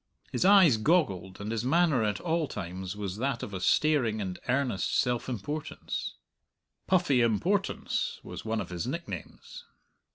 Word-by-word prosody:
His - - 0
eyes 190 - +7
goggled, 110 - +1
and 105 +2 -4
his 115 0 -1
manner 155 -1 +3
at 105 -1 0
all 165 -2 0
times 95 -2 -5
was 100 -2 -4
that 130 +1 -1
of 100 - -6
a 95 - -4
staring 120 -1 +2
and 95 -3 -4
earnest 130 -6 +1
self 125 +1 0
importance. 145 +6 -4 0.7
"Puffy 175 -9 +3
Importance" 170 - 0
was - - -8
one 110 0 -1
of - - -7
his 90 +6 -3
nicknames. 170 +6 -7
120 Hz, 150 wpm, -29 LUFS, 100-155 Hz, 0.7 s, eyes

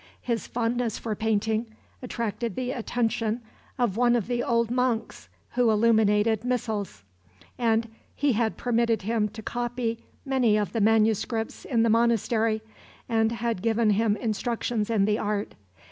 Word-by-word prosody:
His 235 -2 -2
fondness 235 -1 -1
for 225 - -3
painting 220 +1 0 0.3
attracted 230 -3 -3
the 255 0 -2
attention 230 -2 -1 0.4
of 235 -5 0
one 240 0 +4
of 230 -5 0
the 240 -1 -1
old 235 -3 +1
monks, 250 -2 -1 0.2
who 245 -2 +2
illuminated 220 0 +3
missals; 215 - -2 0.5
and 230 -1 +1 0.3
he 285 -2 +2
had 220 0 0
permitted 230 -3 +1
him 215 0 0
to 220 +1 -10
copy 240 -1 -2 0.3
many 255 -6 +3
of 205 -3 -1
the 225 - 0
manuscripts 220 +1 +1
in 230 -3 +2
the 230 - +3
monastery, 225 -1 +2 0.4
and 225 -1 +2
had 230 -4 -2
given 225 0 +2
him 210 0 +2
instructions 225 0 -2
in 215 -4 +3
the 210 +1 +1
art. 205 -1 -2
225 Hz, 145 wpm, -26 LUFS, 215-240 Hz, 0.5 s, one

